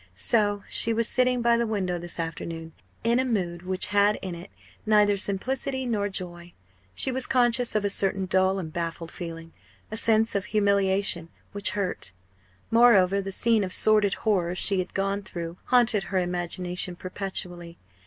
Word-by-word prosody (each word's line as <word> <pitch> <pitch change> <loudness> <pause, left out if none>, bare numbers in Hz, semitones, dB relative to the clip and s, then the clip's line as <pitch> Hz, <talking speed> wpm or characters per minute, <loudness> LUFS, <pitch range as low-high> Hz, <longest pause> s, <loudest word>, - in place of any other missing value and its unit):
So 205 - +1
she 230 - +2
was 230 0 +1
sitting 250 -1 +1
by 235 0 +4
the 235 0 0
window 185 -5 -2
this 175 0 -7
afternoon, 165 0 -5 0.3
in 235 +2 +2
a - - +2
mood 180 -9 -2
which 185 +1 0
had 205 +1 +4
in 185 -2 -4
it 170 +3 -9 0.3
neither 210 -1 +4
simplicity 260 +7 -2
nor 210 -4 -1
joy. 175 -2 -7 0.4
She 265 - +3
was 260 0 0
conscious 245 -2 +2
of 210 -1 +1
a - - +1
certain 195 -1 0
dull 190 +1 +2
and 160 -5 -6
baffled 165 -1 -4
feeling 165 -1 -8 0.4
a 215 - -3
sense 225 0 +3
of 200 -1 -1
humiliation 200 -4 +1 0.2
which 205 -1 +1
hurt. 180 - -3 0.6
Moreover, 200 -5 +5
the 195 0 -5
scene 225 +2 +2
of 185 - -4
sordid 210 -2 +3
horror 180 -5 +1
she 195 +1 +1
had 185 - -4
gone 195 +1 -1
through 170 -3 -7
haunted 240 -6 +3
her 190 - -2
imagination 180 0 -2
perpetually. 175 -2 -6
195 Hz, 165 wpm, -26 LUFS, 175-220 Hz, 0.6 s, Moreover